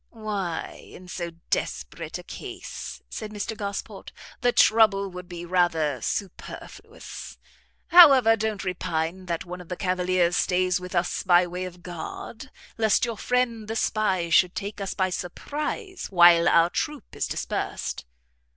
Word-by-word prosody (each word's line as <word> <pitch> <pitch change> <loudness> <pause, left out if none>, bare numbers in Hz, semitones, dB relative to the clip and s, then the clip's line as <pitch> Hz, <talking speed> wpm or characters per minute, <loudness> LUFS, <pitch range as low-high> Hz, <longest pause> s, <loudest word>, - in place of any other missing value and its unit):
"Why 205 -7 -5
in 180 - -12
so 175 -1 -4 0.2
desperate - - -3
a - - -10
case," - - -8
said 215 - -6
Mr 210 +1 -4
Gosport, 200 -2 -6 0.3
"the 245 -1 +3
trouble 210 -4 +4
would 180 0 -9
be 175 -1 -7
rather 165 -7 +1
superfluous. 195 - -6 0.5
However, 275 -10 +8
don't 215 -2 -2
repine 180 0 -3
that 170 0 -3
one 180 0 -7
of 175 - -14
the 180 - -4
cavaliers 180 -2 +1
stays 180 0 +2
with 180 +1 -7
us 175 0 0
by 180 -1 +5
way 180 +1 -5
of 180 -1 -10
guard, 180 +8 -7 0.3
lest 220 0 +3
your 230 -1 -3
friend 235 -1 0
the 225 - -3
spy 190 -6 0
should 180 +2 +4
take 205 0 -5
us 195 - -3
by 185 -1 0
surprize 300 - -4
while 175 -2 +6
our 170 +1 +4
troop 300 -2 -4
is - - -1
dispersed." - - -3
185 Hz, 145 wpm, -25 LUFS, 175-215 Hz, 0.5 s, However